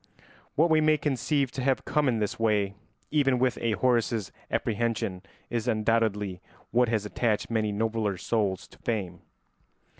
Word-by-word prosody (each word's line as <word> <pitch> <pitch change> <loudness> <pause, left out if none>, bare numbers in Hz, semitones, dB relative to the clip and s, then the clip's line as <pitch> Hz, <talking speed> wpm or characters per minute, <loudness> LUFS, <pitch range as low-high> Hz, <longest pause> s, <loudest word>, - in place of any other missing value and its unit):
What 160 +3 +4
we 155 0 +5
may 155 0 +4
conceive 140 -1 0
to 130 - -4
have 130 0 +1
come 150 -1 +1
in 120 -3 +2
this 105 0 -2
way 105 -3 +2 0.4
even 140 -4 +3
within 125 -1 0
a 115 - +2
Horace's 115 -4 +1 0.2
apprehension 110 -4 -1 0.3
is 120 0 -1
undoubtedly 110 -4 +1 0.3
what 120 0 +3
has 110 -3 0
attached 110 +1 -1
many 110 -2 +1
nobler 110 -2 -1
souls 100 -2 -1
to - - -18
fame. 95 -7 -3
115 Hz, 150 wpm, -28 LUFS, 105-125 Hz, 0.4 s, we